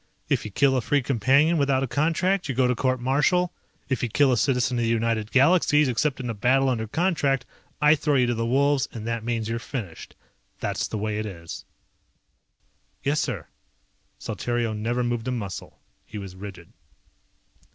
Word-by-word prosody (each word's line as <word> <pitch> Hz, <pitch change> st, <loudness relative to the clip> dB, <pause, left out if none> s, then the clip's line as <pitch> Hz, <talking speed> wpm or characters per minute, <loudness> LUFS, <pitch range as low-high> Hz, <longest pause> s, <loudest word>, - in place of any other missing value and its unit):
If -, -, +1 dB
you -, -, -4 dB
kill 135 Hz, +6 st, +2 dB
a 130 Hz, -, +1 dB
Free 140 Hz, +3 st, +1 dB
Companion 140 Hz, +7 st, +3 dB
without 135 Hz, -2 st, +2 dB
a -, -, -1 dB
contract 170 Hz, +6 st, 0 dB
you 130 Hz, -, -1 dB
go 130 Hz, 0 st, +3 dB
to 125 Hz, -, +2 dB
court 130 Hz, +1 st, 0 dB
martial. 150 Hz, +8 st, +1 dB, 0.3 s
If 130 Hz, -4 st, -1 dB
you 120 Hz, -, -1 dB
kill 140 Hz, +4 st, +3 dB
a -, -, +3 dB
citizen 125 Hz, 0 st, +1 dB
of -, -, +1 dB
the 115 Hz, -, +1 dB
United 115 Hz, -1 st, 0 dB
Galaxies 150 Hz, +1 st, +4 dB
except 130 Hz, +3 st, 0 dB
in 125 Hz, -, -4 dB
a 115 Hz, -, -2 dB
battle 130 Hz, +5 st, +2 dB
under 110 Hz, -3 st, -1 dB
contract 145 Hz, -, 0 dB, 0.3 s
I 150 Hz, 0 st, +6 dB
throw 150 Hz, -1 st, +1 dB
you 125 Hz, -2 st, +4 dB
to 120 Hz, -, 0 dB
the 115 Hz, 0 st, -2 dB
wolves 140 Hz, +2 st, +2 dB
and 110 Hz, -2 st, -7 dB
that 115 Hz, -1 st, -2 dB
means 115 Hz, -2 st, -2 dB
you're 115 Hz, +1 st, -2 dB
finished. 110 Hz, -, -7 dB, 0.4 s
That's -, -, -2 dB
the 110 Hz, -, -4 dB
way 105 Hz, 0 st, -2 dB
it 110 Hz, -, -3 dB
is." 85 Hz, -4 st, -8 dB, 1.4 s
"Yes, 145 Hz, +2 st, +1 dB
sir." -, -, -3 dB, 0.7 s
Saltario 120 Hz, -2 st, -2 dB
never 115 Hz, +3 st, -1 dB
moved 120 Hz, 0 st, -2 dB
a -, -, 0 dB
muscle. 105 Hz, -6 st, -5 dB, 0.3 s
He -, -, -9 dB
was 95 Hz, -2 st, -7 dB
rigid. 95 Hz, -3 st, -10 dB
125 Hz, 185 wpm, -25 LUFS, 115-140 Hz, 1.4 s, I